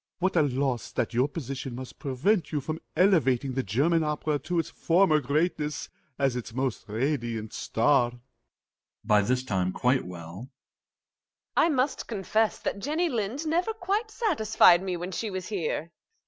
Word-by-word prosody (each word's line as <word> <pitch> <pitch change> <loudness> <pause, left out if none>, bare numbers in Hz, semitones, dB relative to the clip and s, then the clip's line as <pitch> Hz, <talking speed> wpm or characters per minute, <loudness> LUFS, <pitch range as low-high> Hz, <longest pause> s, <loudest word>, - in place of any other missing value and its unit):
What 190 +1 0
a 165 - +5
loss, 135 -3 -1
that - - -1
your 125 +4 +3
position 135 -4 -5
must 130 0 -9
prevent 155 - 0
you 150 - 0
from 155 +3 -5
elevating 140 -9 +3
the 135 - 0
German 145 - +2
opera 150 -1 -1
to 175 +4 -3
its 165 -1 -1
former 170 -2 +3
greatness, 150 +2 -1 0.3
as 135 -3 +1
its 120 -2 -6
most 130 -2 -2
radiant 115 -2 -2
star! 120 +1 +2
MRS. - - -15
GOLD 120 - -16 0.8
(by 105 -1 +5
this 125 +5 0
time 95 -6 0
quite 125 +1 +1
well). 90 +7 -9 1.1
I 335 - +4
must 265 -2 0
confess 215 +1 0
that - - -2
Jenny 315 - 0
Lind 240 +5 -2
never 350 +8 +1
quite 420 +2 -1
satisfied 220 - +4
me 185 -2 -2
when 175 +2 -5
she 215 +4 -3
was 185 -1 -5
here. 170 -4 -2
150 Hz, 160 wpm, -27 LUFS, 125-195 Hz, 1.1 s, a